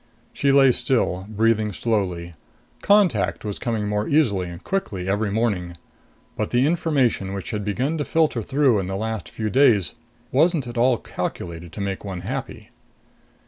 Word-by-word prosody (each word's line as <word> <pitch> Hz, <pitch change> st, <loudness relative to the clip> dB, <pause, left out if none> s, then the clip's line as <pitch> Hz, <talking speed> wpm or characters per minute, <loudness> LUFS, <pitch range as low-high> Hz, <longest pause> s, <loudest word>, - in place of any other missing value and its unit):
She 140 Hz, -, +2 dB
lay 135 Hz, -1 st, +6 dB
still, 120 Hz, -7 st, 0 dB
breathing 110 Hz, 0 st, +1 dB
slowly. 90 Hz, -6 st, -2 dB, 0.5 s
Contact 110 Hz, -, +2 dB
was 105 Hz, -2 st, -4 dB
coming 110 Hz, -3 st, -2 dB
more 105 Hz, +1 st, -1 dB
easily 105 Hz, -, +2 dB
and 85 Hz, +1 st, -10 dB
quickly 100 Hz, -, -3 dB
every 100 Hz, +2 st, 0 dB
morning. 100 Hz, -6 st, -1 dB, 0.6 s
But 110 Hz, -, -2 dB
the 125 Hz, +2 st, +2 dB
information 140 Hz, -, +1 dB
which 95 Hz, -, -5 dB
had 105 Hz, -2 st, -3 dB
begun 130 Hz, +10 st, -1 dB
to 145 Hz, -, -1 dB
filter 155 Hz, -7 st, +1 dB
through 135 Hz, -2 st, +2 dB
in 95 Hz, -, -3 dB
the 95 Hz, -, -3 dB
last 110 Hz, +1 st, -4 dB
few 110 Hz, -1 st, -3 dB
days 120 Hz, -9 st, +4 dB, 0.4 s
wasn't 160 Hz, +1 st, +3 dB
at 120 Hz, 0 st, -7 dB
all 120 Hz, +1 st, +3 dB
calculated 85 Hz, -4 st, -5 dB
to 105 Hz, -, -6 dB
make 100 Hz, -1 st, -3 dB
one 95 Hz, -3 st, -5 dB
happy. 130 Hz, +8 st, -6 dB
110 Hz, 160 wpm, -23 LUFS, 95-130 Hz, 0.6 s, lay